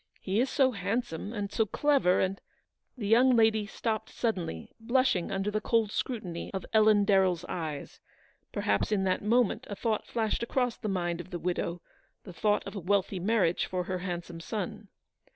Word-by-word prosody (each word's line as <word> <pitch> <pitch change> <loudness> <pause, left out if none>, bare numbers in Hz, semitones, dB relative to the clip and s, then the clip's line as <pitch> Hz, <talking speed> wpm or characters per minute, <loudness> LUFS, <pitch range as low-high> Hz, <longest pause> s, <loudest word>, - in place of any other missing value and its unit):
He 195 +3 -1
is 255 +2 +2
so 265 -3 +3
handsome, 200 -2 -3
and 205 -3 -4
so 220 +1 +1
clever, 275 -9 +3
and— 190 +1 -1 0.3
" - - -51
The 220 - -4
young 245 +4 +5
lady 220 -2 +3
stopped 220 0 -3
suddenly, 180 - -3
blushing 235 -5 +1
under 195 +1 -1
the 215 0 -1
cold 225 -2 +1
scrutiny 195 -11 -4
of 190 - -3
Ellen 215 -2 +5
DarrelFs 190 -4 +3
eyes. 155 -5 -5 0.5
Perhaps 100 - 0
in 200 -2 +2
that 185 -1 +1
moment 230 +1 +2
a 205 - -4
thought 220 0 -1
flashed 220 -2 -1
across 245 0 0
the 215 - -4
mind 175 -2 -1
of 180 - -13
the 180 - -4
widow; 175 -1 -2 0.4
the 185 - -10
thought 210 +3 +1
of - - -7
a - - -3
wealthy 195 +1 0
marriage 190 -3 +1
for 180 -1 -2
her 185 0 -3
handsome 175 -2 -5
son. 205 +4 -5
205 Hz, 180 wpm, -29 LUFS, 180-225 Hz, 0.5 s, young